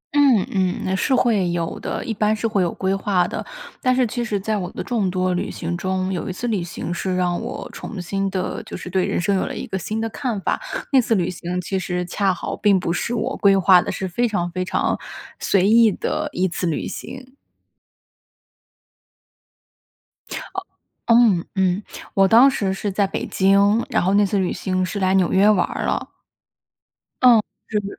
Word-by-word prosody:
嗯 270 -9 +5
嗯， 185 -2 0
那 190 - 0
是 260 +7 +1
会 215 -8 +2
有 170 -1 -3
的， - - -4
一 225 - -2
般 210 +1 +1
是 220 +2 -1
会 210 -3 0
有 175 -2 +1
规 190 0 -1
划 195 -2 +1
的。 - - -4 0.4
但 255 0 +2
是 255 -1 +3
其 240 +2 -3
实 210 -3 -2
在 215 +2 -1
我 180 -3 -4
的 - - -5
众 220 -6 0
多 185 0 0
旅 175 - -2
行 170 +1 -4
中， 185 +1 -2
有 180 - -3
一 - - -2
次 215 +7 -4
旅 210 -6 0
行 175 0 -5
是 185 +1 -2
让 180 -1 0
我 - - -6
重 215 - -7
新 195 +2 -2
地 185 -1 -3
就 - - -7
是 180 - -8
对 185 0 +1
人 - - -1
生 195 +3 +1
有 190 - +1
了 - - -5
一 - - -5
个 190 - -4
新 215 +5 -3
的 225 - -1
看 235 -2 -3
法。 - - -1 0.3
那 270 -2 +6
次 230 -1 +1
旅 180 -3 0
行 180 0 -4
其 190 +2 -2
实 180 0 -2
恰 195 +2 0
好 180 - -4
并 200 -3 +3
不 170 -1 -1
是 235 +7 -2
我 235 +3 -2
规 195 -2 +4
划 185 -1 +6
的， - - -3
是 190 - -3
非 240 +7 0
常 175 -6 -1
非 185 +1 -2
常 185 - 0 0.4
随 195 -1 +2
意 225 0 +6
的 305 +9 -2
一 185 -5 0
次 180 0 -3
旅 160 - -2
行。 260 +1 -9 2.9
啊 - - -4 0.8
嗯 220 -8 +4
嗯， 190 +1 +1 0.3
我 195 0 +4
当 235 +6 +7
时 200 -7 -1
是 200 +2 -3
在 200 +1 +2
北 230 +5 -4
京， 200 +1 +3
然 - - +1
后 190 +3 +2
那 205 0 +5
次 200 +1 0
旅 185 -2 0
行 185 -1 -1
是 200 +2 -4
来 185 0 +2
纽 190 -2 +2
约 200 +3 +5
玩 200 -4 +3
儿 - - -5
了。 - - -1 1.1
嗯， 245 -4 +7 0.3
这 215 - 0
个 205 - -7
195 Hz, 225 characters per minute, -21 LUFS, 185-220 Hz, 2.9 s, 当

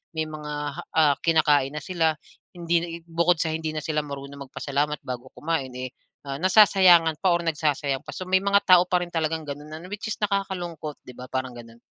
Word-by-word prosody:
may 160 - 0
mga 150 -1 -7 0.2
ha 175 - -7
ah, 150 -3 +5
kinakain 150 -4 +3
na 150 - -5
sila. 165 -3 +1 0.4
Hindi 170 -1 -1
bukod 170 +1 +2
sa 160 - 0
hindi 160 0 -3
na 155 - -3
sila 155 0 -1
marunong 140 -1 -8
magpasalamat 145 +2 -2
bago 125 0 -6
kumain, 150 -5 -2
eh, 130 0 -5 0.4
ah, 135 0 -4
nasasayangan 180 -4 +5
pa 185 -2 +2
or 170 - -2
nagsasayang 150 -4 -1
pa. - - -5
So - - -5
may 190 0 +4
mga 200 0 +4
tao 180 -2 +8
pa 180 -1 +1
rin 175 - -9
talagang 160 -1 -1
gano'n 145 +2 -7
ano, 160 +3 -8
which 210 +2 -5
is - - -1
nakakalungkot, 185 -7 -3
'di - - -8
ba 125 +1 -9
parang 130 -1 -3
gano'n. 115 -1 -12
160 Hz, 200 wpm, -25 LUFS, 145-175 Hz, 0.4 s, tao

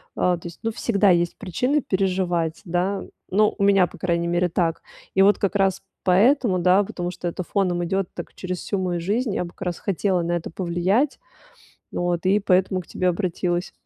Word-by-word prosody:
А, 180 -1 +2
то 170 - -9
есть, 170 - -11
ну, 225 - 0
всегда 205 -3 +2
есть 175 -1 +2
причины 250 - 0
переживать, 180 -5 -1
да. 180 +3 -1 0.3
Ну, 210 +2 +3
у 200 - 0
меня, 195 -3 +5
по - - -14
крайней 170 -2 0
мере, 175 +1 +1
так. 165 -1 0 0.3
И 190 - +5
вот 205 +1 +5
как 200 0 -1
раз 195 -1 +2 0.2
поэтому, 200 +1 +3
да, 185 +3 +4
потому 175 -2 -4
что 175 - -5
это 180 +1 -3
фоном 180 -2 0
идёт 190 +2 -1
так - - -8
через 185 -1 -5
всю 200 - -3
мою 180 -2 -1
жизнь, 215 +4 0
я - - 0
бы - - -8
как - - -28
раз 175 - -3
хотела 190 -1 0
на 170 +1 -2
это 170 - -3
повлиять. 185 - 0 0.7
Вот, 175 0 -1
и 200 +2 +4
поэтому 185 -1 +2
к - - -22
тебе 185 - -1
обратилась. 175 -1 -1
185 Hz, 200 wpm, -23 LUFS, 175-200 Hz, 0.7 s, меня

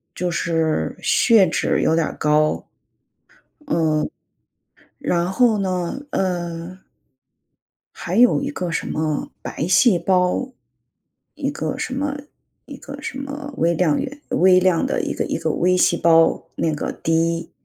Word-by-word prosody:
就 180 0 -2
是 165 -2 -1
血 220 -6 +4
脂 160 - 0
有 160 - +3
点 165 -1 +2
儿 - - -8
高。 150 0 +1 1.0
嗯， 155 -2 +1 0.9
然 175 +1 0
后 225 +1 +3
呢， 185 +3 -2
呃 175 -1 -3 1.2
还 175 +3 -4
有 245 +3 +5
一 280 - -3
个 180 -11 -4
什 155 - -2
么 155 -1 -2
白 155 - -4
细 185 +2 +4
胞， 180 +8 +1 0.8
一 - - -2
个 - - -4
什 255 - -3
么 285 +1 -2 0.5
一 - - -9
个 - - -10
什 265 - -6
么 285 +1 -6
微 170 +1 +2
量 160 -3 +1
元 285 +1 -6
微 185 0 +5
量 180 -2 +2
的 - - -1
一 - - -3
个 - - -2
一 - - -2
个 - - -2
微 180 +1 +2
细 175 - +3
胞， 165 -1 +3
那 160 -2 0
个 150 - -3
低。 165 +1 -1
175 Hz, 155 characters per minute, -21 LUFS, 165-200 Hz, 1.2 s, 有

